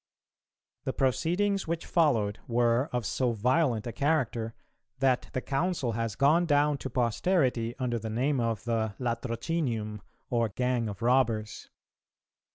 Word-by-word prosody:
The 130 - -1
proceedings 175 +9 +1
which 170 0 -2
followed 115 -12 +2
were 120 +3 +2
of 125 -3 -2
so 125 +3 0
violent 125 +1 +1
a 120 - -3
character, 120 -6 0 0.4
that 130 -1 +1
the 130 - -1
Council 140 -2 -1
has 115 -2 -2
gone 160 +5 +4
down 145 -1 +3
to 135 - -5
posterity 125 - +1
under 125 -3 -1
the 110 +1 -5
name 130 +5 0
of 115 -3 -1
the 110 -3 -1
Latrocinium 115 -2 -2 0.3
or 115 -2 +2
"Gang 125 +1 -1
of 100 +2 -7
Robbers." 115 -4 +1
125 Hz, 135 wpm, -29 LUFS, 115-145 Hz, 0.4 s, gone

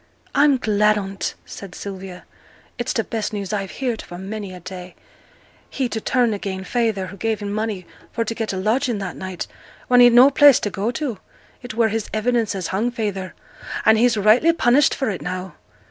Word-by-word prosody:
'I'm 285 -1 +4
glad 210 -2 +2
on 195 -1 -5
't,' - - -3
said 195 -3 -10
Sylvia; 190 -2 -8 0.6
'it's 240 - -1
t' 225 - 0
best 220 -1 -3
news 200 -1 -4
I've 195 -2 -2
heered 245 -4 -3
for 175 - -10
many 200 +1 -6
a 180 - -9
day, 180 0 -9 0.7
he, 265 -2 -1
to 220 - -3
turn 245 -2 +2
again' 195 -2 -4
feyther, 220 -3 0
who 195 +2 -10
gave 220 -1 -1
him 205 -1 -4
money 215 -4 -3 0.3
fo 230 - -1
t' 230 - -3
get 225 -1 -3
a 190 - -4
lodging 230 +5 0
that 195 -2 -5
night, 185 -2 -5 0.4
when 245 0 +6
he'd 245 -1 +8
no 255 +4 +8
place 285 -2 +7
to 205 - -2
go 200 +4 -2
to. 245 -4 -3 0.4
It 245 -2 -8
were 230 -1 +3
his 220 0 -3
evidence 230 -1 +1
as 185 -3 -3
hung 215 +6 +1
feyther; 205 -5 -4 0.5
and 220 - +7
he's 235 +1 +3
rightly 220 +11 +5
punished 275 -2 +3
for 265 -5 -1
it 190 - -5
now.' 185 +1 -5
215 Hz, 200 wpm, -21 LUFS, 195-240 Hz, 0.7 s, he'd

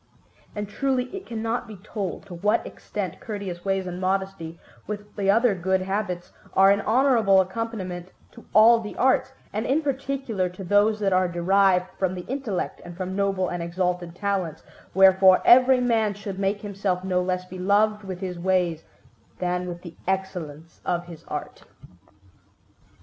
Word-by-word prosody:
And 210 0 -3
truly 260 - -1
it 390 - -8
cannot 230 +1 -3
be 215 - -9
told 200 0 -5
to 195 - -10
what 210 +6 +1
extent 190 -5 -6
courteous 200 -5 -6
ways 195 -1 0
and 180 0 -5
modesty, 190 -3 -2 0.3
with 210 0 -7
the 195 -2 0
other 225 +2 +4
good 190 +1 0
habits, 190 -2 -3 0.2
are 195 +1 +7
an 200 +1 +2
honourable 225 -5 +4
accompaniment 185 -3 -3 0.2
to - - -14
all 230 +3 +7
the 210 -2 -7
arts, 260 0 +2 0.2
and 215 +2 -1
in 295 +5 +2
particular 270 -8 -2
to 180 +2 -9
those 205 +3 +3
that 195 -2 +2
are 185 0 +3
derived 180 +1 +3
from 185 -1 0
the 180 - -7
intellect 245 -9 -3
and 175 0 -10
from 185 0 -4
noble 195 -2 0
and 175 -1 -3
exalted 175 0 -2
talents; 190 -5 -2 0.3
wherefore 190 -1 +7
every 255 +1 +7
man 225 -4 +1
should 200 -1 -6
make 200 +1 0
himself 195 -3 -2
no 180 -1 +1
less 180 0 -2
beloved 205 +4 +1
with 190 -1 -6
his 180 -2 -4
ways 175 -3 +1 0.5
than 180 0 -1
with 175 0 -7
the 170 -2 -9
excellence 170 -5 -4
of 175 -1 -1
his 170 -3 -11
art. - - -6
195 Hz, 160 wpm, -25 LUFS, 180-215 Hz, 0.5 s, are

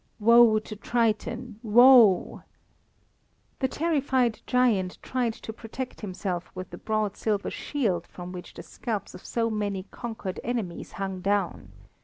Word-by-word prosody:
"Woe 230 0 +6
to 215 0 -5
Triton, 225 0 -1
woe!" 235 -3 +6 1.2
The 265 - +2
terrified 265 -7 0
giant 225 -8 +2
tried 245 -3 -1
to 220 - -8
protect 245 +3 -7
himself 185 -3 -4
with 185 0 -7
the - - -8
broad 215 -2 -1
silver 210 -2 -1
shield, 200 - -2
from 180 0 -9
which 180 -1 -9
the - - -8
scalps 215 -5 -5
of - - -11
so 230 -1 -1
many 205 -3 -2
conquered 220 -5 -5
enemies 225 -8 -4
hung 190 -1 -4
down. 195 - -1
215 Hz, 135 wpm, -27 LUFS, 190-240 Hz, 1.2 s, Woe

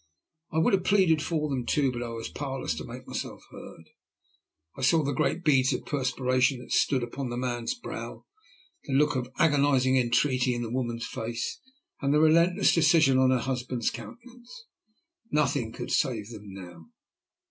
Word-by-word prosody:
I 160 - -3
would 160 - +3
have 190 -2 +2
pleaded 185 -6 +3
for 155 -2 -1
them 135 -4 -2
too, 135 +1 +1
but 120 -1 -5
I 120 - -4
was 115 -1 -5
powerless 135 - -4
to 80 -1 -6
make - - -10
myself - - -6
heard. 80 -1 -12 0.8
I - - -9
saw 155 +4 +3
the 140 0 -1
great 175 +7 0
beads 135 -4 +3
of - - -4
perspiration 130 -1 +1
that 125 - -12
stood 130 -4 +2
upon 125 +2 -5
the 120 - -4
man's 120 - -2
brow, 240 - -8 0.6
the 135 - -4
look 145 +1 +3
of 125 -1 -3
agonizing 140 -4 +3
entreaty 125 0 +2
in 120 - -3
the 115 - -5
woman's 120 -2 -2
face, 120 - -4 0.4
and 140 0 +1
the 150 - +4
relentless 170 +3 +4
decision 155 -5 +4
on 130 0 +4
her 130 - +3
husband's 125 -1 -2
countenance. 245 - -12 0.6
Nothing 140 - 0
could - - -7
save 115 -6 0
them 105 -2 -10
now. 90 -4 -11
130 Hz, 170 wpm, -27 LUFS, 120-150 Hz, 0.8 s, the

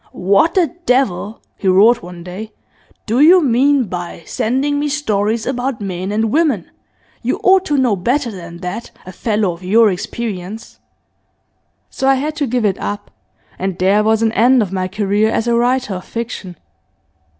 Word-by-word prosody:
"What 200 - +2
the 345 -4 +2
devil," 230 -4 0
he 195 - -3
roared 210 +6 +5
one 175 -1 -10
day, 195 +5 -8 0.5
"do 230 +4 0
you 340 +6 +7
mean 270 +2 +3
by 175 -4 -6
sending 275 +5 -1
me 295 0 -1
stories 220 -6 -1
about 255 -1 -2
men 190 -1 -4
and 220 +1 0
women? 285 - +1 0.5
You - - -1
ought 380 0 +4
to 295 - 0
know 250 -6 +2
better 240 +7 -1
than 170 -3 -10
that, 195 +6 -5 0.2
a 185 - -8
fellow 210 0 -1
of 170 +1 -10
your 215 +3 +4
experience!" 200 +2 -6 1.1
So 265 - -2
I 270 - +5
had 295 +3 -3
to 285 - 0
give 245 -1 0
it 195 -2 0
up, 205 0 -5 0.5
and 190 -1 -2
there 195 +3 +3
was 220 +1 +2
an 225 - +2
end 240 +2 +4
of 195 - -6
my 185 -1 -1
career 205 +2 0
as 225 - -1
a 235 - +2
writer 245 -1 +1
of 180 -1 -6
fiction. 215 -6 -6
220 Hz, 170 wpm, -17 LUFS, 190-255 Hz, 1.1 s, you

